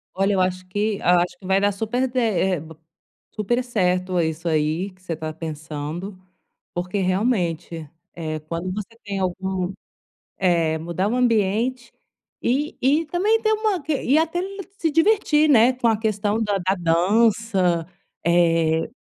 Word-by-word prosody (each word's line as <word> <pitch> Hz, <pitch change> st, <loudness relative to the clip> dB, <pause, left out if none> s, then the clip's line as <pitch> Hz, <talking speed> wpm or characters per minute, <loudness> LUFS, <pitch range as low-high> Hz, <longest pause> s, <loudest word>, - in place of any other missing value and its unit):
Olha, 195 Hz, +2 st, +2 dB
eu 190 Hz, -, +2 dB
acho 185 Hz, 0 st, -1 dB
que 205 Hz, +2 st, -1 dB
eu -, -, -11 dB
acho 180 Hz, +7 st, +3 dB
que -, -, -14 dB
vai 190 Hz, +1 st, +3 dB
dar 205 Hz, 0 st, +2 dB
super 225 Hz, +6 st, -1 dB
de 255 Hz, +1 st, -1 dB
eh, 190 Hz, -6 st, +1 dB
b 160 Hz, +1 st, -11 dB, 0.6 s
super 240 Hz, +4 st, -1 dB
certo 185 Hz, -5 st, 0 dB
isso 160 Hz, +1 st, -2 dB
aí 160 Hz, +4 st, 0 dB
que 185 Hz, 0 st, -25 dB
você 175 Hz, -3 st, -4 dB
está 155 Hz, 0 st, -5 dB
pensando, 160 Hz, +4 st, -6 dB, 0.6 s
porque 180 Hz, +3 st, -2 dB
realmente, 180 Hz, -, -1 dB, 0.2 s
eh, 155 Hz, -2 st, -4 dB
quando 165 Hz, +4 st, -4 dB
você 205 Hz, +1 st, -5 dB, 0.2 s
tem 200 Hz, -1 st, -3 dB
algum 185 Hz, 0 st, -2 dB, 0.7 s
eh, 165 Hz, -4 st, +2 dB
mudar 170 Hz, +4 st, -2 dB
o 235 Hz, -, 0 dB
ambiente, 235 Hz, +1 st, +1 dB, 0.5 s
e 280 Hz, +5 st, 0 dB
e 290 Hz, +6 st, +3 dB
também 415 Hz, +8 st, +1 dB
ter 435 Hz, -, +2 dB
uma 430 Hz, -6 st, 0 dB
que 290 Hz, -1 st, -1 dB
e 275 Hz, -, +2 dB
até 325 Hz, +2 st, +1 dB
l 390 Hz, +2 st, -4 dB, 0.2 s
se 320 Hz, -2 st, 0 dB
divertir, 325 Hz, -3 st, +3 dB
né, 240 Hz, -1 st, +6 dB
com 245 Hz, -2 st, 0 dB
a 225 Hz, -, +3 dB
questão 215 Hz, 0 st, -1 dB
da 205 Hz, -2 st, 0 dB
da 185 Hz, +1 st, 0 dB
dança, 185 Hz, 0 st, +2 dB, 0.4 s
eh. 165 Hz, -2 st, +3 dB
190 Hz, 160 wpm, -23 LUFS, 175-240 Hz, 0.7 s, né